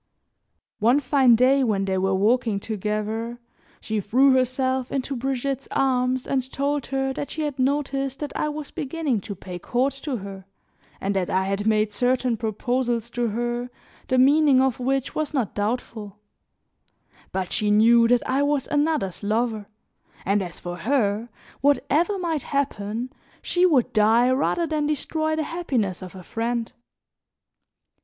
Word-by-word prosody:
One 240 +6 +4
fine 260 -3 +4
day 260 +3 +4
when 205 -5 +1
they 190 -1 -1
were 190 0 +1
walking 220 +1 +2
together, 215 +3 -3 0.4
she 220 -1 -2
threw 260 +7 +4
herself 260 0 0
into 275 0 -2
Brigitte's 270 +2 -2
arms 255 -1 +1
and 260 -1 -2
told 280 0 -1
her 270 0 -1
that 285 - -5
she 315 - -3
had 290 -3 -3
noticed 275 0 0
that 295 -2 -5
I 300 - 0
was 300 -1 -6
beginning 280 -6 -2
to 200 - -7
pay 180 -1 -8
court 255 +8 0
to 280 -5 -3
her, 195 -1 -9 0.5
and 195 +1 -2
that 185 -2 0
I 190 0 +1
had 200 +2 -2
made 215 -1 +2
certain 250 +1 +1
proposals 235 +1 -1
to 240 0 -1
her, 240 +2 -2 0.4
the 255 - +1
meaning 280 +1 +5
of 265 -2 +1
which 270 +1 -1
was 310 0 -2
not 245 -7 -1
doubtful; 210 -1 -3 1.1
but 190 -1 -3
she 210 - 0
knew 230 +3 +5
that 245 0 +2
I 265 +2 +1
was 285 -2 +1
another's 290 - 0
lover, 215 0 -1 0.6
and 200 +2 +2
as 175 -3 -6
for 175 0 -6
her, 220 +1 0 0.3
whatever 290 +7 +2
might 330 -5 -1
happen, 245 -3 -3 0.3
she 360 +1 +3
would 275 -9 +2
die 225 +3 +4
rather 285 +6 +1
than 305 -2 -1
destroy 315 +1 -1
the 315 - -1
happiness 260 - -2
of 185 0 -9
a 185 - -9
friend. 230 +3 -3
250 Hz, 155 wpm, -24 LUFS, 215-275 Hz, 1.1 s, meaning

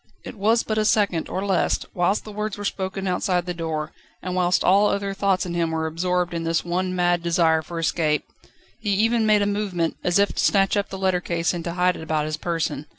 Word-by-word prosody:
It - - -7
was 220 +3 +2
but 215 0 -1
a - - +2
second, 200 -6 +1
or 190 - -3
less, 190 -2 +2 0.2
whilst 180 +3 +1
the 215 - -9
words 210 0 -4
were 205 - -6
spoken 195 0 -3
outside 180 -1 0
his 180 -1 -4
door, 160 -2 -3 0.3
and 185 - -3
whilst 180 0 +2
all 200 +3 +5
other 200 -1 -1
thoughts 195 -1 +1
in 175 - -4
him 170 -1 0
were 160 0 -2
absorbed 175 +2 -1
in 165 -1 -3
this 165 0 0
one 185 +1 -1
mad 175 -1 +2
desire 165 -2 +2
for 170 +2 -8
escape. 160 -2 0 0.6
He 210 - -3
even 225 +2 +2
made 210 -1 +4
a - - +1
movement, 200 -5 -1
as 175 +1 +2
if 200 0 +2
to - - -1
snatch 195 0 +3
up 205 -1 -1
the 190 - -6
letter 190 -2 +1
case 170 -1 -1
and 175 -1 -4
to 170 - -3
hide 180 0 +2
it - - -8
about 155 -1 -1
his 155 0 -3
person. 165 -3 -2
180 Hz, 235 wpm, -23 LUFS, 170-200 Hz, 0.6 s, all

